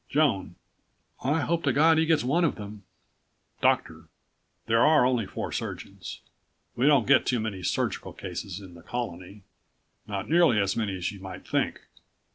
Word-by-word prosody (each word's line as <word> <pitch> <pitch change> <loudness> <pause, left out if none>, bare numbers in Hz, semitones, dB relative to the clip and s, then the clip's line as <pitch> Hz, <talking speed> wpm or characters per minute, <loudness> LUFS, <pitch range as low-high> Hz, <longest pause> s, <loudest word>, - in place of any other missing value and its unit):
Joan: 115 - +1 0.7
I 150 +5 +1
hope 165 +3 0
to 140 - +2
God 160 +4 +5
he 160 - +2
gets 160 -2 +3
one 155 +8 +2
of 165 - +2
them. 105 -1 -9 0.8
Doctor: - - +1 0.6
There 115 +1 +3
are 150 -5 +5
only 125 -5 +1
four - - -5
surgeons. - - -6 0.5
We 130 +4 +2
don't 140 -6 +5
get - - +5
too 125 - 0
many 110 -4 -4
surgical 90 - -2
cases 90 +1 -6
in 95 -3 -12
the 85 - -13
Colony 100 -2 -6 0.6
not - - -4
nearly 165 -9 +4
as 100 -1 +1
many 105 -4 -1
as 90 - -2
you 100 - -11
might 95 -1 -9
think. - - -1
115 Hz, 165 wpm, -27 LUFS, 95-150 Hz, 0.8 s, God